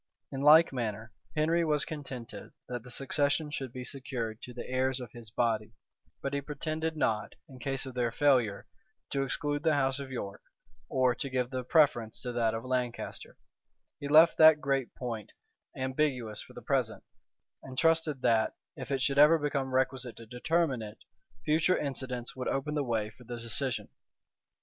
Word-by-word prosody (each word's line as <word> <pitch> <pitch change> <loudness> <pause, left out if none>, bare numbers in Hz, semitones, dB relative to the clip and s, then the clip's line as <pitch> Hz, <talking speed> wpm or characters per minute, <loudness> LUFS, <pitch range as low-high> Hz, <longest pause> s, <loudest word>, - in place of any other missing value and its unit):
In 135 - -4
like 155 +2 +7
manner, 110 -3 -3 0.2
Henry 165 +3 +2
was 150 -2 +1
contented 130 - -7
that 120 -1 -4
the 125 - -13
succession 145 +4 0
should 135 -4 -4
be 125 +1 -6
secured 125 -4 -4
to 125 - -8
the 120 0 -7
heirs 130 +1 0
of 125 -4 -8
his 120 -3 -9
body; 110 -1 0 0.5
but 140 - -2
he 140 - 0
pretended 155 +3 -3
not, 110 -7 0
in 130 -2 -13
case 135 +2 -1
of 130 - -7
their 120 -2 0
failure, 125 -7 +2 0.5
to 140 - 0
exclude 145 +2 -1
the 160 -1 +3
house 135 -1 +1
of 140 -1 -6
York 100 -6 -5 0.5
or 130 -2 +3
to 140 - -4
give 125 -1 -1
the 130 -1 -2
preference 125 -6 +3
to 125 - -3
that 115 -2 +1
of 115 - -5
Lancaster: 125 -2 -3 0.6
he 145 - -4
left 160 +3 +6
that 155 -1 +9
great 135 -4 0
point 115 -5 -5 0.4
ambiguous 130 -5 -1
for - - -13
the - - -10
present, - - 0 0.6
and 130 -1 -10
trusted 160 -3 +2
that, 110 -1 +3 0.2
if - - -7
it 135 -2 0
should 140 +1 +2
ever 150 +3 +8
become 140 -3 -1
requisite 130 -1 0
to 115 - -11
determine 130 +3 0
it, 105 0 -8 0.5
future 160 +4 +3
incidents 130 -3 -4
would 130 -1 -4
open 135 +2 -1
the 150 -1 0
way 110 -4 -1
for 125 - -17
the 120 0 -6
decision. 115 +2 -2
130 Hz, 175 wpm, -30 LUFS, 120-145 Hz, 0.6 s, that